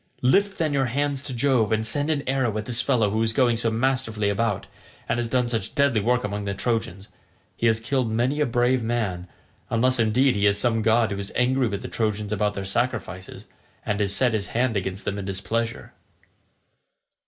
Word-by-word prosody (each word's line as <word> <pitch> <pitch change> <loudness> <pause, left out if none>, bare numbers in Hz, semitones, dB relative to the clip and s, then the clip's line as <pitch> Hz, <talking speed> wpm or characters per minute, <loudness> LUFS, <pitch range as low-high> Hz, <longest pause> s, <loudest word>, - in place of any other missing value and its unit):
Lift 195 +10 +3
then 155 -3 0
your 135 -2 +1
hands 140 +2 -1
to 135 - -7
Jove 125 -4 +1
and 110 0 +1
send 145 +6 +2
an 145 -3 -1
arrow 130 -5 0
at 110 - -4
this 120 +1 0
fellow 120 -7 +1
who 110 +1 0
is 110 0 +3
going 120 -1 +3
so 115 0 0
masterfully 115 -3 0
about, 100 0 -1 0.4
and - - 0
has 120 -1 -2
done 125 -1 +1
such 115 -2 -3
deadly 140 -7 +3
work 125 +3 +1
among 105 0 -3
the 100 0 -2
Trojans. 100 -4 -2 0.5
He 115 - +1
has 110 -1 +3
killed 125 +1 -1
many 120 +6 0
a 150 - +2
brave 120 +1 +2
man—unless 115 +3 -2
indeed 120 +4 +3
he 100 0 +2
is 100 0 +3
some 115 0 +1
god 110 0 +3
who 100 - -3
is 100 0 -4
angry 125 +1 +2
with 100 -1 -4
the - - -4
Trojans 105 -2 -2
about 105 0 0
their 100 - -4
sacrifices, 95 -3 -3 0.4
and 105 0 -1
has 100 -2 0
set 120 +4 +2
his 105 -2 -1
hand 120 -2 +1
against 95 0 -3
them 100 0 -2
in 100 - -6
his 95 -1 -3
displeasure." 115 +4 -3
115 Hz, 205 wpm, -24 LUFS, 105-130 Hz, 0.5 s, Lift